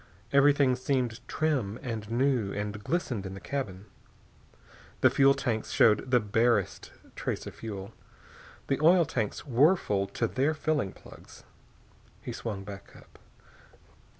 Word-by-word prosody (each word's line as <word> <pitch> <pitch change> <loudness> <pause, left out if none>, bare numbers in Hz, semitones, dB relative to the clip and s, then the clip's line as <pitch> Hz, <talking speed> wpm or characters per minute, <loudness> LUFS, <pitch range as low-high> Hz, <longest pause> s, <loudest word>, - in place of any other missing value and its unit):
Everything 140 -2 +5
seemed 125 -3 -1
trim 135 -10 -1
and 110 -5 -5
new 120 -4 +1
and 105 0 -4
glistening 130 - -2
in 95 -1 -6
the - - -8
cabin. 100 -9 -5 1.2
The - - +6
fuel 140 0 +5
tanks 110 -4 -2
showed 110 +3 +3
the 125 -1 +5
barest 110 -1 0 0.2
trace - - -3
of - - -7
fuel. 100 -1 -7 0.7
The 135 - -1
oil 170 +2 +6
tanks 115 -7 -3
were 145 +7 +5
full 100 - -1
to 115 - -2
their 135 +7 0
filling 150 -11 -1
plugs. - - -15 0.8
He - - -7
swung 105 -4 -5
back 100 -1 -10
up. - - -18
120 Hz, 135 wpm, -29 LUFS, 105-140 Hz, 1.2 s, The